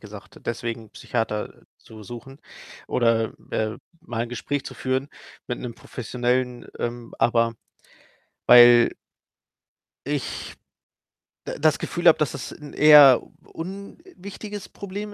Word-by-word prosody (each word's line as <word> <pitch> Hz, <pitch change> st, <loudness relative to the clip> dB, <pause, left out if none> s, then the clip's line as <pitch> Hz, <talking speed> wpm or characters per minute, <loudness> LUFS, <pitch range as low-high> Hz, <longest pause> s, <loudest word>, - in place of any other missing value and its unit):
gesagt, 105 Hz, -1 st, -12 dB
deswegen 115 Hz, 0 st, -4 dB
'nen 110 Hz, -, -17 dB
Psychiater 105 Hz, -1 st, -3 dB, 0.2 s
zu 110 Hz, -1 st, -14 dB
suchen 120 Hz, +5 st, -10 dB, 0.5 s
oder, 115 Hz, -2 st, +1 dB, 0.2 s
äh, 110 Hz, +1 st, -2 dB, 0.2 s
mal 120 Hz, -9 st, -4 dB
'n -, -, -9 dB
Gespräch 135 Hz, +3 st, -4 dB
zu -, -, -8 dB
führen 130 Hz, +2 st, -2 dB, 0.4 s
mit 125 Hz, -, -4 dB
'nem 120 Hz, -2 st, -6 dB
professionellen 125 Hz, +1 st, -3 dB
ähm, 120 Hz, 0 st, -5 dB
aber 115 Hz, -1 st, +2 dB, 0.9 s
weil 120 Hz, -1 st, +8 dB, 1.2 s
ich 145 Hz, -2 st, -4 dB, 0.9 s
d -, -, -4 dB
das 155 Hz, -1 st, +3 dB
Gefühl 175 Hz, 0 st, -1 dB
habe, 165 Hz, -, +7 dB
dass 150 Hz, -, 0 dB
das 140 Hz, -, -7 dB
'n 150 Hz, -1 st, -12 dB
eher 145 Hz, -4 st, +8 dB, 0.2 s
unwichtiges 200 Hz, +2 st, -9 dB
Problem 205 Hz, +1 st, -7 dB
125 Hz, 120 wpm, -24 LUFS, 115-150 Hz, 1.2 s, weil